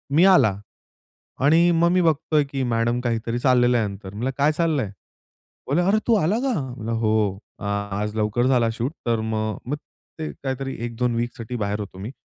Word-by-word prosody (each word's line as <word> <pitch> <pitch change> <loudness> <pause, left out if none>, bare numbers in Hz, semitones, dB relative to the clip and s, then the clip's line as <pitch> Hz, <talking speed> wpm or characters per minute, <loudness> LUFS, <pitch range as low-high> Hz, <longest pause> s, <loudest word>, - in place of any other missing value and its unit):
मी 170 +4 +6
आला 105 - +4 0.9
आणि 165 +4 +5
मग 170 +1 +3
मी 180 0 +3
बघतो 160 -2 +1
आहे 150 -1 +4
की 135 -1 -3
मॅडम 120 +1 +1
काहीतरी 115 0 -1
चाललेलं 125 -1 +4
आहे 110 - +1
यांचं 100 -1 -7
म्हणलं, 120 +6 -2
"काय 145 +2 +3
चाललं 155 -2 +1
आहे?" 100 - -6 0.8
बोले, 150 +6 +3
"अरे! 195 +4 +3
तू 235 - +5
आला 200 +2 +2
का? 265 0 0 0.2
म्हटलं, 115 -2 -5
"हो, 110 -3 +1 0.2
आज 100 +1 -3
लवकर 110 +3 +1
झाला 120 -3 +3
शूट." 120 +4 -2 0.2
तर 115 -1 +2
मग 110 -1 -2
मग 145 - -1 0.4
ते 155 - -3
काहीतरी 135 0 -3
1-2 120 0 -1
वीकसाठी 120 0 -4
बाहेर 105 -1 -2
होतो 100 -2 -7
मी. 105 +6 -6
120 Hz, 185 wpm, -23 LUFS, 110-150 Hz, 0.9 s, मी